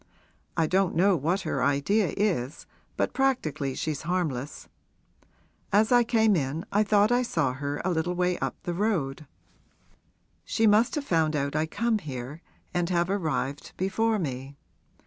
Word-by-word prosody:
I 165 - +3
don't 185 +2 +1
know 190 +3 +4
what 170 +6 0
her 135 - -2
idea 145 +9 +1
is, 165 -9 -1 0.3
but - - 0
practically 155 - 0
she's 155 -3 -3
harmless. 155 -6 -3 1.0
As 215 +3 +3
I 245 -1 +6
came 220 -3 +3
in 150 +1 -2
I 205 - +3
thought 210 +1 +3
I 245 +1 +3
saw 165 - 0
her 145 +2 -4
a 185 - +1
little 175 +1 -1
way 180 0 0
up - - -2
the 175 - -2
road. 165 -8 -1 1.2
She 225 - 0
must 220 +9 +4
have 295 -2 -3
found 160 - +1
out 140 0 -1
I 155 +1 +1
come 225 +5 0
here 140 -1 -7 0.3
and 175 -1 0
have 175 0 +1
arrived 155 -7 -2
before 220 +4 +1
me. 135 -5 -5
175 Hz, 155 wpm, -27 LUFS, 145-210 Hz, 1.2 s, I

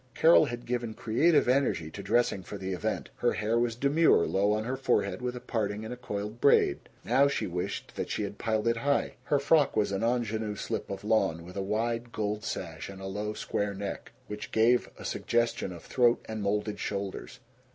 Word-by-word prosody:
Carol 165 +1 +6
had 120 0 -6
given 120 -2 -2
creative 145 +8 +3
energy 125 - +1
to 100 - -7
dressing 105 0 +1
for 100 - -8
the 95 -1 -4
event. 90 - -3
Her - - +2
hair 110 +2 0
was 120 -1 0
demure, 140 - +4
low 100 +2 +2
on 110 +1 0
her 125 +3 -2
forehead 100 -7 0
with 125 0 -3
a - - -5
parting 105 -2 -2
and 115 - -5
a - - -5
coiled 105 -2 -5
braid. 140 - +4 0.3
Now 140 +1 +4
she 140 - -1
wished 90 0 -4
that - - -3
she - - -1
had 100 0 -6
piled 110 0 0
it 115 0 +2
high. 140 +4 +1
Her 145 - +2
frock 145 -1 +3
was 105 -2 +2
an 95 - -1
ingenue 110 -3 0
slip - - -4
of 100 - -5
lawn, 100 -6 +1
with 90 - -11
a 100 - -2
wide 115 +4 -1
gold 105 -1 -2
sash 85 -1 -5
and 95 -1 -9
a 95 - -7
low 105 +2 -3
square 100 -1 -2
neck, 100 0 -5
which 105 0 -7
gave 120 +2 +3
a - - -9
suggestion 115 -5 0
of 85 -2 -9
throat 120 -2 +2
and 110 -1 -4
molded 105 +1 -1
shoulders. 100 -1 -4
110 Hz, 205 wpm, -29 LUFS, 100-120 Hz, 0.3 s, Carol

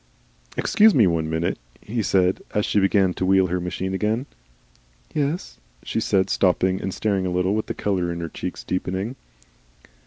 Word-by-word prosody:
"Excuse 215 0 +5
me, 115 - +6
one 80 -3 0
minute," 80 +1 -1 0.2
he 115 +2 -3
said, 95 -2 +2
as 105 - +2
she 105 - +2
began 95 -1 +3
to - - -4
wheel 95 0 +4
her 90 0 -1
machine 90 +2 -3
again. 110 +6 0 0.9
"Yes?" 150 - -2 0.2
she - - -2
said, 95 -3 +2
stopping 95 0 +2
and 95 - -3
staring 95 0 0
a - - -2
little, 90 +2 +1
with 110 0 -1
the - - -4
colour 90 -4 -1
in 85 - -4
her 85 -1 -4
cheeks - - -6
deepening. 95 +6 -3
95 Hz, 175 wpm, -23 LUFS, 90-105 Hz, 0.9 s, me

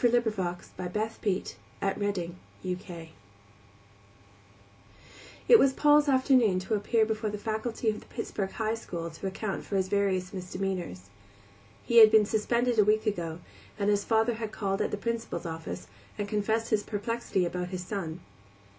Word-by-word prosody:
Paul's 240 -1 +4
Case 200 -7 -1
A 180 -1 -3
Study 210 -1 -1 0.4
in 195 -1 0
Temperament 180 -2 -5 2.4
It 465 - +9
was 270 -1 +4
Paul's 295 +1 +5
afternoon 260 -7 +4
to 190 - -3
appear 220 +2 +2
before 215 0 -2
the 210 - -4
faculty 220 +2 -3
of 215 - -6
the - - -17
Pittsburgh 195 -2 -3
High 220 -1 -1
School 170 -7 -5
to 160 +5 -5
account 195 +1 -3
for 200 - -4
his 190 -1 +1
various 195 -2 0
misdemeanors. 180 - -4 0.7
He 235 - +1
had 220 -1 +11
been 215 -1 +6
suspended 235 +2 +1
a - - +8
week 215 +2 +2
ago, 170 -5 -2 0.4
and 205 0 +2
his 205 0 +2
father 225 +1 +2
had 220 -1 -5
called 195 -3 -1
at - - +1
the - - -3
Principal's 230 0 -3
office 165 +2 -5 0.3
and 205 -1 -2
confessed 220 +2 0
his 215 -1 +3
perplexity 205 -2 -1
about 180 +1 -3
his 180 0 -5
son. 175 -4 -4
205 Hz, 155 wpm, -29 LUFS, 185-225 Hz, 2.4 s, had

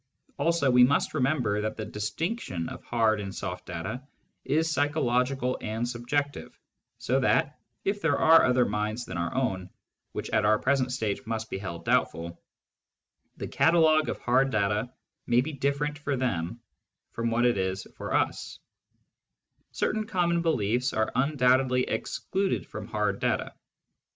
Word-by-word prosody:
Also 165 -5 +2
we 125 0 +7
must 135 +3 +2
remember 125 -7 +1
that 110 +1 -3
the 110 - -4
distinction 105 - -3
of - - -9
hard 110 -3 +1
and 95 -1 -6
soft 90 -2 -5
data 85 +10 -4 0.4
is 160 +3 +1
psychological 135 -3 +1
and 110 +2 -2
subjective, 130 +4 -3 0.4
so 130 +2 0
that, 135 +2 +1 0.3
if 200 +1 0
there 155 -5 +2
are 165 +1 +7
other 125 -1 +3
minds 105 +3 -2
than 95 - -7
our 85 - -1
own 95 -9 -1 0.2
— - - -56
which - - -5
at 110 -1 +2
our 105 +1 +4
present 130 0 +1
stage 110 -5 -2
must 110 -1 -3
be - - -3
held 85 -4 -6
doubtful 85 +1 0 0.5
— - - -49
the - - -5
catalogue 160 -2 +4
of - - -2
hard 130 +2 +2
data 105 +1 0 0.4
may 120 +1 +4
be 155 +4 -4
different 140 +2 -1
for 145 -1 -1
them 115 -5 -2 0.5
from 115 0 -2
what 120 +1 +2
it 120 -5 +3
is 95 0 -2
for - - -6
^s) - - -1 0.6
* - - -49
Certain 215 0 0
common 170 -4 +1
beliefs 125 -5 +1
are 110 0 0
undoubtedly 130 -1 +3
excluded 195 +8 -2
from - - -8
hard - - -1
data. - - -1
125 Hz, 155 wpm, -27 LUFS, 105-145 Hz, 0.6 s, we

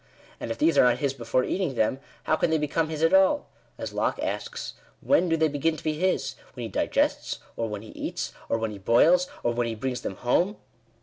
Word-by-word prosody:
And - - -5
if - - -3
these 315 +3 +3
are - - +8
not 125 - +4
his 140 -2 0
before 125 0 0
eating 180 -5 -1
them, 115 +4 +1 0.2
how 155 - +2
can 160 - +1
they 160 - +3
become 155 +1 0
his 160 0 -3
at 165 - +4
all? 190 +10 +4 0.3
As - - -5
Locke - - 0
asks, - - -4
" - - -28
when 230 -11 +3
do 165 - +2
they 160 0 +3
begin 155 +2 0
to - - -11
be 155 - 0
his? 155 -4 0 0.2
when 125 - -5
he 115 - -4
digests? - - 0 0.2
or 115 -1 -2
when 105 0 -5
he 110 - -11
eats? - - -4 0.2
or - - +2
when 110 -1 -2
he 100 - -8
boils? 165 - +4 0.2
or 120 - +1
when 120 0 0
he 115 - -3
brings 125 +2 -3
them 95 - -4
home 175 - +1
145 Hz, 240 wpm, -26 LUFS, 115-165 Hz, 0.3 s, are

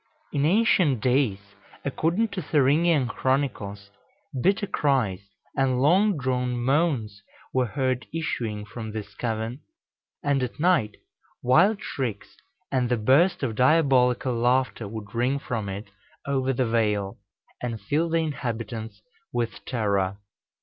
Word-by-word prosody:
In 140 0 +1
ancient 180 - +3
days, 105 -5 0 0.3
according 170 +10 +1
to 195 -2 -4
the 150 - -13
Thüringian 150 0 +3
Chronicles, 110 -6 -2 0.5
bitter 195 +5 +2
cries 130 - 0 0.3
and 130 -2 +2
long 185 +7 +4
drawn 125 -2 -1
moans 125 -5 0 0.3
were 130 -1 +2
heard 130 0 -1
issuing 115 -10 -3
from 110 -1 -7
this 105 -1 -6
cavern; 115 +3 -3 0.6
and 140 -2 +1
at 125 +2 -4
night, 165 - +2 0.5
wild 190 - +4
shrieks 120 -7 -4 0.4
and 125 -3 +1
the 125 - +2
burst 140 - +3
of 120 -4 0
diabolical 130 -1 +3
laughter 120 -1 +1
would 105 -1 -8
ring 125 +4 +1
from 115 -7 -4
it 100 +2 -7 0.3
over 135 -1 0
the 130 0 0
vale, 105 -4 0 0.4
and 115 -2 -3
fill 150 +11 0
the 165 - +2
inhabitants 115 -6 -4 0.3
with 115 -1 -3
terror. 100 -5 0
125 Hz, 130 wpm, -25 LUFS, 110-145 Hz, 0.6 s, long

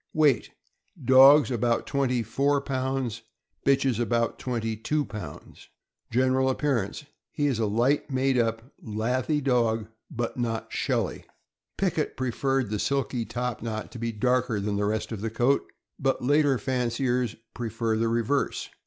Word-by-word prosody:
Weight. 150 -7 +3 0.3
— - - -17
Dogs, 135 +2 +8
about 120 0 +1
twenty 125 -4 0
four 140 +6 +1
pounds; 130 -4 -2 0.4
bitches, 135 -4 +2
about 115 0 0
twenty 115 -3 -2
two 145 +7 -1
pounds. 95 -11 -9 0.4
General 130 +2 +2
appearance. 130 -2 -1
— - - -61
He 145 - -1
is 135 -6 +1
a 110 - +1
light 120 +9 +1
made 135 0 +1
up, 115 -2 +1 0.2
lathy 125 +7 -1
dog, 115 -5 +1 0.2
but 120 +1 -3
not 115 -2 -3
shelly. - - -1 0.5
Pickett 175 -5 -1
preferred 130 -1 0
the 105 - -1
silky 135 -3 -1
top 120 +1 -3
knot 110 -1 -4
to 120 - -8
be 115 0 -2
darker 125 0 +1
than 100 +1 -2
the 100 0 0
rest 110 +2 -2
of 110 -3 -5
the 115 - -2
coat, 120 +5 +1 0.3
but 135 -2 0
later 145 -1 +3
fanciers 125 -2 -1 0.2
prefer 115 -1 -2
the 115 +1 +1
reverse. 115 +5 0
125 Hz, 150 wpm, -27 LUFS, 115-135 Hz, 0.5 s, Dogs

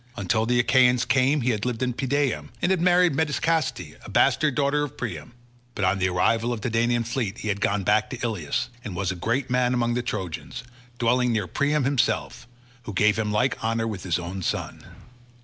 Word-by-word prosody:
Until 110 +3 0
the 120 0 +2
Achaeans 125 0 +4
came 135 +2 +2
he 125 +1 +1
had 105 -3 -3
lived 125 -1 -2
in 125 -1 0
Pedaeum, 130 - -1
and 175 - +1
had 185 -3 +1
married 180 -2 +4
Medesicaste, 150 - -1
a - - -10
bastard 150 -4 +2
daughter 145 +1 +1
of 145 - -6
Priam; 90 -9 -5 0.4
but 100 - 0
on 95 +2 +1
the 95 0 +1
arrival 115 +6 +1
of 115 -3 -3
the 125 - -2
Danaan 120 +1 +1
fleet 115 -3 -3
he 110 - -5
had 100 0 -2
gone 100 -1 +1
back 110 +3 +2
to 130 - -5
Ilius, 110 +1 -2
and 100 - -6
was 95 0 -1
a - - -5
great 120 +8 -2
man 125 0 +2
among 120 -1 +1
the 125 - 0
Trojans, 95 -8 -5 0.3
dwelling 125 +1 +2
near 110 -4 0
Priam 145 - 0
himself, 130 -2 -1 0.4
who 105 - -6
gave 105 +3 +3
him 105 -1 -1
like 125 +4 0
honour 115 0 0
with 105 -4 -5
his 90 -3 -1
own 90 +2 -5
sons. - - -3
120 Hz, 205 wpm, -25 LUFS, 105-130 Hz, 0.4 s, Achaeans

